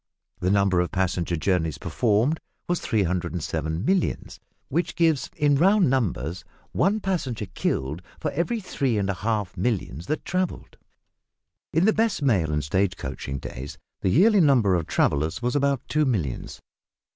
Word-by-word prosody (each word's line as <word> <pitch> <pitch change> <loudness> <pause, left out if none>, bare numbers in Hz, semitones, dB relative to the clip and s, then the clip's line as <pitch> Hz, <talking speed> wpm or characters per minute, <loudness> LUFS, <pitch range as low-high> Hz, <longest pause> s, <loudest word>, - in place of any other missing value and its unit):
The 90 - 0
number 100 -2 +3
of 90 - +1
passenger 90 -2 0
journeys 80 -2 0
performed 120 +7 +1 0.3
was 175 -1 0
307 85 - -1
millions, 190 +1 0 0.3
which 170 +6 -1
gives, 165 -5 +2
in 145 -1 +3
round 190 -1 +4
numbers, 90 - -1 0.3
one 200 +4 +2
passenger 150 - -2
killed 75 -4 -2 0.2
for 150 - -2
every 225 +10 -1
three 140 - -1
and 100 -1 0
a - - -2
half 105 -1 -2
millions 90 - -2
that 155 - -2
travelled. 185 -1 -3 0.9
In 165 +4 +3
the 220 - +4
best 220 -8 +1
mail 95 - +2
and 75 0 0
stage 95 +6 0
coaching 70 0 -5
days 65 +1 -7 0.2
the - - +1
yearly 200 - +5
number 125 - +4
of 85 -3 0
travellers 75 +5 +1
was 125 +3 0
about 140 -2 +1
two 150 0 +2
millions. 90 - -2
105 Hz, 150 wpm, -25 LUFS, -, 0.9 s, yearly